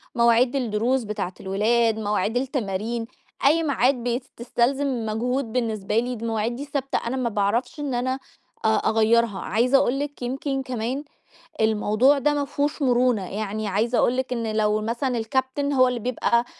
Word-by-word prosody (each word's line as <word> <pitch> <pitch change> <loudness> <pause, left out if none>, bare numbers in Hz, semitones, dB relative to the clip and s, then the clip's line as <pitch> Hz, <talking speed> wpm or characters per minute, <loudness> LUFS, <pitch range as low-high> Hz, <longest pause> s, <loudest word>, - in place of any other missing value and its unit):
مواعيد 235 +2 +4
الدروس 245 +1 0
بتاعة 205 -4 -4
الولاد، 220 +3 +1
مواعيد 210 +2 0
التمارين، 230 -3 -2 0.4
أي 320 +4 +4
معاد 275 -3 +2
بيت 245 +1 -2
تستلزم 245 +1 0
مجهود 240 +3 -1
بالنسبة 220 -4 -1
لي 245 +1 -2
المواعيد 230 0 -2
دي 285 +3 -6
ثابتة 280 -2 -2
أنا 260 +3 -2
ما 250 -2 0
باعرفش 220 +6 -1
إن 285 -3 -2
أنا 260 +2 -1 0.5
أ - - +5
أغيّرها. 220 -1 +2
عايزة 245 +6 +2
أقول 270 +1 +1
لِك 290 -2 -5
يمكن 270 +2 -2
كمان 255 +2 -3 0.6
الموضوع 220 +5 +3
ده 295 +2 +2
ما 285 -1 0
فيهوش 285 +2 -2
مرونة. 245 -6 +2
يعني 215 +1 -3
عايزة 225 +5 0
أقول 250 +2 +2
لِك 260 -1 -1
إن 225 -2 -2
لو 215 0 +2
مثلًا 235 +2 -1
الcaptain 265 +3 -1
هو 255 -1 +5
اللي 250 -1 -1
بيبقى 235 0 +1
240 Hz, 160 wpm, -24 LUFS, 220-265 Hz, 0.6 s, أ